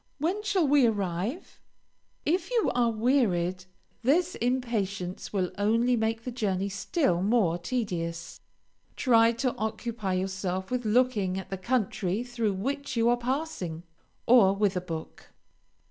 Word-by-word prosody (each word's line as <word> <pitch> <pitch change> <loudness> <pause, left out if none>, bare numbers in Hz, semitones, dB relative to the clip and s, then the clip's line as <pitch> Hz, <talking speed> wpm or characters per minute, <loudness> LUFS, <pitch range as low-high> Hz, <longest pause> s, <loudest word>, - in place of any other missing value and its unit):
"When 350 +8 -1
shall 400 -6 +1
we 275 -3 +5
arrive?" 205 - -3 0.7
If 345 +3 0
you 475 -3 +2
are 240 -1 +2
wearied, 210 -7 +1 0.4
this 335 +9 +2
impatience 215 -7 -2
will 185 -3 -1
only 230 +4 +3
make 225 0 -1
the 250 - -4
journey 200 -5 -1
still 200 - 0
more 195 -5 +2
tedious. 175 -5 -3 0.5
Try 230 -4 +4
to 245 +1 -1
occupy 220 -2 -3
yourself 190 +1 -2
with 250 -2 -1
looking 215 -5 +2
at 190 - -7
the - - -1
country 210 -2 -1
through 235 -4 -1
which 275 +9 -3
you 230 +1 +4
are 240 - +4
passing, 245 - -3 0.4
or 215 -5 +6
with 200 -1 +1
a 180 - 0
book. 165 -3 -7
225 Hz, 135 wpm, -28 LUFS, 190-250 Hz, 0.7 s, or